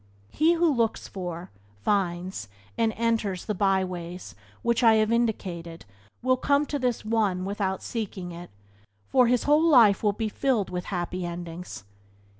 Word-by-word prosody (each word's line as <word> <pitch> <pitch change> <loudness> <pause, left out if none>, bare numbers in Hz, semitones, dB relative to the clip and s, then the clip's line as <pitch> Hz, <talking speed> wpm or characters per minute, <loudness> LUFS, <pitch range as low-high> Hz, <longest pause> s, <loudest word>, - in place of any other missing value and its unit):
He 320 +3 +3
who 340 0 +2
looks 230 -3 0
for, 175 -2 -6 0.3
finds, 180 - -1 0.3
and 225 -1 +1
enters 220 -5 -1
the 210 - -1
byways 185 -3 -1 0.3
which 235 -1 +1
I 225 -2 +6
have 215 0 +2
indicated 180 -8 -2 0.4
will 255 0 +3
come 280 +3 +2
to 290 -1 -3
this 245 -4 -1
one 210 -5 0
without 195 -1 -2
seeking 195 -6 -5
it, 175 +1 -9 0.6
for 250 -2 +4
his 245 0 +2
whole 295 +2 +4
life 240 - +6
will 210 -2 +2
be 220 +1 -2
filled 220 -3 0
with 180 0 -4
happy 180 -1 -3
endings. 175 - -6
205 Hz, 150 wpm, -26 LUFS, 180-235 Hz, 0.6 s, I